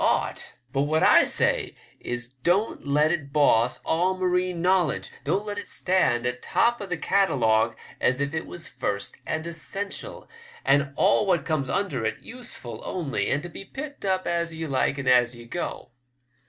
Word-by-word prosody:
ought; - - 0 0.2
but 135 - +1
what 155 +2 +1
I - - +7
say - - +1 0.2
is 120 +1 -5
don't 180 - +1
let 150 +2 +3
it 145 -5 -2
boss 125 -5 +3
all 180 +3 +1
marine 180 -1 0
knowledge, 180 -3 +1
don't 205 +2 0
let 205 -1 -3
it - - -8
stand 130 -10 +1
atop 125 - +1
of 200 - -6
the 180 - -1
catalogue 115 - +2 0.2
as 130 +1 +2
if 140 +1 -1
it 160 - -3
was 170 -2 -7
first 100 -6 -3
and 155 +1 -2
essential, 200 - -4 0.4
and 140 0 +3
all 200 +4 +3
what 180 -3 +2
comes 150 -5 -1
under 140 - -1
it, 110 - -1
useful 225 - -7
only, 155 -6 -2
and 145 - 0
to 175 - -6
be 185 - -8
picked 285 +8 -8
up 190 -1 0
as 170 -1 0
ye 160 0 -4
like 140 -1 0
and 140 - -4
as 125 -1 +4
ye 120 0 -11
go. 175 +2 -5
160 Hz, 175 wpm, -25 LUFS, 130-185 Hz, 0.4 s, I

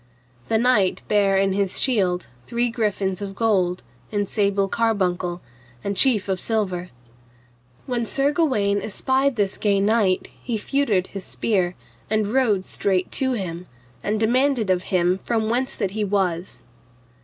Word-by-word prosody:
The 220 - +2
knight 220 -5 +2
bare 200 -2 +3
in 195 0 +2
his 195 -1 0
shield 190 -9 +1 0.2
three 240 0 0
griffins 205 -4 -1
of 195 -1 -5
gold, 190 -5 +1 0.3
in 205 -1 -1
sable 200 -1 +1
carbuncle, 185 -6 0 0.4
the 200 - -1
chief 210 -2 +3
of 190 -1 -1
silver. 185 -6 -1 1.0
When 240 -3 -2
Sir 275 +4 +1
Gawaine 215 -11 +1
espied 265 +6 0
this 200 -3 -1
gay 200 -2 +2
knight, 200 -2 +2
he 235 -3 -2
feutred 215 -5 +1
his 195 -1 -5
spear, 185 -5 0 0.3
and 215 0 0
rode 215 -8 +2
straight 190 -2 -1
to 260 -1 0
him, 180 -5 -4 0.3
and 210 +1 -1
demanded 240 -1 +2
of 180 0 0
him 180 0 +2
from 225 0 -1
whence 255 +2 -1
that 195 - -2
he 215 +1 -2
was. 190 -3 -1
205 Hz, 145 wpm, -23 LUFS, 190-230 Hz, 1.0 s, bare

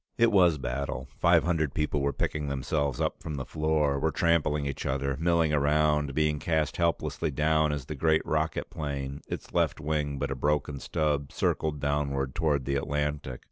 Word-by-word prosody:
It 115 -1 +4
was 90 -6 +5
battle. 65 0 -3
Five - - +5
hundred 80 -5 0
people 75 -2 0
were 70 +1 +1
picking 75 +1 -2
themselves 70 0 -1
up - - -1
from 75 - -5
the 65 -2 -4
floor, 75 -2 +1
were 80 - +1
trampling 80 -3 +1
each 70 -1 -4
other, 70 0 -1
milling 85 -2 +2
around, 75 -1 +2
being 75 -1 +1
cast 80 -1 0
helplessly 85 -1 0
down 75 +1 +2
as 75 -3 -3
the 75 - -5
great 80 +2 +2
rocket 80 0 -1
plane, 70 -2 -4
its - - -6
left - - +1
wing 75 -1 -1
but 70 0 -2
a - - -1
broken 75 +1 0
stub, 75 -2 -1
circled 75 -2 -1
downward 70 -2 -1
toward 75 -6 0
the 70 0 0
Atlantic. 75 -2 -2
75 Hz, 180 wpm, -28 LUFS, 70-80 Hz, -, was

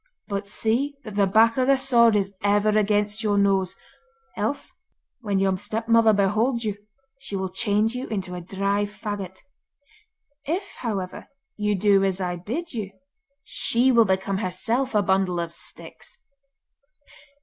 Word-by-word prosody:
But 200 -1 -3
see 240 +8 -1
that 215 - -8
the 200 -1 +2
back 225 +4 +4
of 255 0 +2
the 275 0 +5
sword 235 -4 +4
is 200 -1 0
ever 205 +1 +2
against 210 0 +1
your 210 -2 +1
nose, 195 -2 +2 0.6
else 225 +7 -3 0.5
when 205 -5 -1
your 190 -1 +2
stepmother 225 +1 +3
beholds 215 +4 +1
you, 210 -2 -1 0.4
she 235 -6 -6
will 190 -1 -2
change 210 +3 +1
you 250 +1 -4
into 190 -4 -4
a 180 - -5
dry 200 +3 -1
faggot. 205 -3 -6 1.1
If, 360 +7 -3
however, 195 -6 -4 0.3
you 210 -1 0
do 195 0 +3
as 190 -1 0
I 180 -1 -2
bid 270 - -5
you, 205 -4 -5 0.5
she 250 0 +2
will 235 -2 +5
become 190 0 0
herself 225 +7 -1
a 205 - +4
bundle 190 -2 +1
of 170 -1 -4
sticks. - - -11
205 Hz, 150 wpm, -24 LUFS, 195-230 Hz, 1.1 s, the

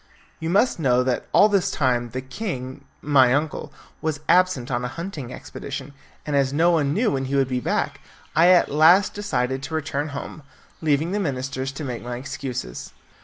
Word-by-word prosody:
You 160 - -3
must 200 +3 +2
know 125 -4 +3
that 125 -1 -1
all 205 - +6
this 200 -2 +1
time 125 -7 0
the 130 +3 -4
king, 130 - -6 0.2
my 130 -4 +5
uncle, 150 +2 -2 0.3
was 155 -2 -2
absent 180 -8 +3
on 120 0 -1
a - - -1
hunting 155 -4 -6
expedition, 140 0 -7 0.3
and 150 - -1
as 135 -1 +2
no 165 +5 +3
one 150 -4 +2
knew 215 +8 +1
when 135 -1 -1
he 135 +2 -2
would 135 -1 +3
be 125 -1 0
back, - - -2 0.3
I 165 +3 +6
at 180 -1 +5
last 165 +7 +5
decided 130 -10 -1
to 145 +4 -5
return 145 -1 -2
home, 145 +1 -7 0.4
leaving 155 +2 +1
the 205 - 0
ministers 135 -5 -3
to 145 - -6
make 125 -4 -4
my 120 0 -5
excuses. 130 - -6
140 Hz, 185 wpm, -23 LUFS, 130-165 Hz, 0.4 s, all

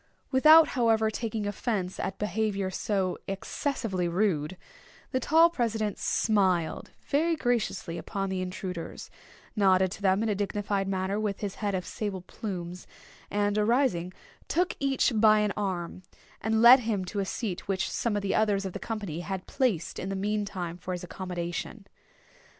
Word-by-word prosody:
Without, 310 +4 +7
however, 225 -3 +2
taking 220 -1 -3
offence 205 -2 -2
at 195 - -3
behaviour 210 -2 -1
so 190 -1 -1
excessively 195 -1 -2
rude, 175 -2 0 0.5
the 260 - +1
tall 320 +6 +5
president 220 - -1
smiled 190 -6 +1 0.2
very 325 +4 +2
graciously 230 - -1
upon 195 -2 -3
the 185 -1 -1
intruders—nodded 185 +1 -2
to - - -8
them 195 +1 +3
in 225 - 0
a - - +2
dignified 200 0 -1
manner 195 +1 -1
with 210 -2 -2
his 200 -2 -3
head 205 -2 0
of 180 -1 -3
sable 205 -5 -4
plumes—and, 200 +2 -4
arising, 210 -6 +2 0.4
took 355 +1 +1
each 275 -2 +2
by 215 0 +6
an 210 -1 0
arm, 185 -3 -3 0.4
and 220 +1 +1
led 250 +3 +10
him 220 -5 -1
to 200 +3 -4
a - - +1
seat 190 -2 -4
which 190 -1 0
some 225 -3 -1
others 200 0 +1
of 190 - -4
the - - -5
company 205 -8 -4
had 190 +1 -4
placed 235 - -1
in 190 - -4
the 195 - -2
meantime 195 -4 -2
for 180 +1 -5
his 180 - -5
accommodation. 180 +3 -5
200 Hz, 150 wpm, -28 LUFS, 185-220 Hz, 0.5 s, led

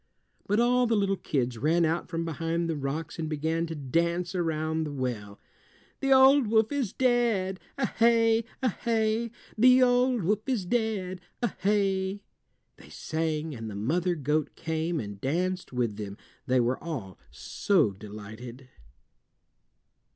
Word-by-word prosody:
But 205 +2 +2
all 245 +1 +3
the 230 - +2
little 200 -1 +1
kids 125 -9 -2
ran 165 +5 +3
out 165 +2 -1
from 165 -1 -2
behind 165 +1 -2
the 165 - -1
rocks 145 +4 -4
and 160 -1 -2
began 160 +2 -1
to 165 - -5
dance 170 +6 -1
around 160 -2 -1
the 150 - -4
well. 120 -7 -4 0.6
"The 270 -1 0
old 265 -1 +7
wolf 220 +2 +3
is 275 -8 -1
dead, 235 -7 +1 0.2
A 270 - +1
hey! 230 -1 +3 0.2
A 255 - +4
hey! 225 +1 0 0.3
The 255 +2 +7
old 245 -2 +3
wolf 205 +4 +2
is 230 -8 0
dead, 195 -4 -1 0.2
A 240 - +3
hey!" 195 0 0 0.5
they - - -15
sang, 160 -1 -3
and 115 -3 -6
the 105 - -7
mother 170 - 0
goat 150 0 -1
came 160 0 -2
and 100 -4 -7
danced 180 +6 -1
with 120 -5 -1
them, 100 -1 -6 0.3
they 130 0 +3
were 120 +1 0
all 125 - -6
so 185 - +1
delighted. 110 +6 -10
170 Hz, 150 wpm, -28 LUFS, 145-220 Hz, 0.6 s, old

